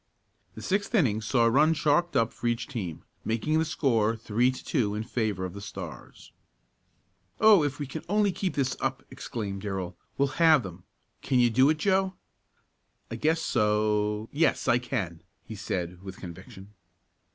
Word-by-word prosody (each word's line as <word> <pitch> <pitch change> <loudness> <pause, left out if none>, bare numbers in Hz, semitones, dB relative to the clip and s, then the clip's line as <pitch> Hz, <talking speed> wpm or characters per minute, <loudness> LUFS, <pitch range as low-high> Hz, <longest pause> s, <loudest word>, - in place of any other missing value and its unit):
The - - -9
sixth 200 +4 -1
inning 115 - +2
saw 115 +2 +2
a - - +5
run 155 +6 +4
chalked 170 +4 +1
up 115 0 +2
for 120 - -4
each 120 +1 0
team, 95 - -5 0.2
making 135 +8 0
the - - +3
score 115 -8 +1
three 115 +2 +1
to 130 - -6
two 110 -9 0
in 105 - -2
favor 110 -5 -2
of 90 - -6
the 100 - -8
Stars. 100 - -9 1.1
"Oh, 215 -5 +7
if 145 -1 -2
we 145 - -4
can 145 +4 -7
only 205 0 +3
keep 185 0 -3
this 135 -2 0
up!" 135 0 -2
exclaimed 105 -6 -5
Darrell, 95 -3 -4 0.2
"we'll 140 +2 0
have 160 -5 +6
them. 90 -1 -10 0.4
Can 130 - 0
you 120 -1 +4
do 130 +5 +5
it, 155 - +2
Joe?" 190 +2 +1 1.0
"I - - -3
guess 160 +1 +1
so 105 -1 +1
yes, 160 +3 +1
I 120 - +4
can!" 105 -10 -4 0.2
he - - -8
said 90 -1 -4
with 95 -1 -9
conviction. 95 +3 -11
120 Hz, 175 wpm, -27 LUFS, 105-150 Hz, 1.1 s, Oh